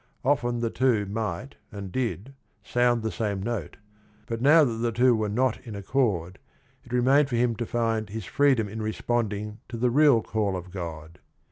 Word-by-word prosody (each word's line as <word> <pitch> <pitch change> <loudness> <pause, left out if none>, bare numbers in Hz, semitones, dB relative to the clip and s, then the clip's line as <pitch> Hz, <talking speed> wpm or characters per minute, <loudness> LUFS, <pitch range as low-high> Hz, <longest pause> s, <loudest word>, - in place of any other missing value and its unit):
Often 120 -4 +1
the 115 -1 -1
two 120 -6 +2
might, 105 +4 -4
and 100 -2 -7
did, 125 +1 -3 0.3
sound 120 +1 +1
the 110 - -1
same 100 +2 -2
note, 110 -8 -4 0.5
but 115 0 -4
now 155 +4 +7
that 120 -5 0
the 115 +1 0
two 120 +2 +4
were 110 -1 -1
not 125 +3 +1
in 110 -3 -8
accord, 100 -5 -1 0.4
it 120 - -16
remained 135 +3 +3
for 120 - -1
him 120 -1 +2
to 120 -1 -3
find 115 -2 -1
"his 110 -1 -6
freedom 135 -4 +2
in 110 +2 -6
responding 110 -1 -2
to 115 - -5
the 120 +1 +1
real 140 -4 +5
call 105 -4 -1
of 90 0 -9
God." 85 -2 -7
115 Hz, 180 wpm, -26 LUFS, 105-125 Hz, 0.5 s, now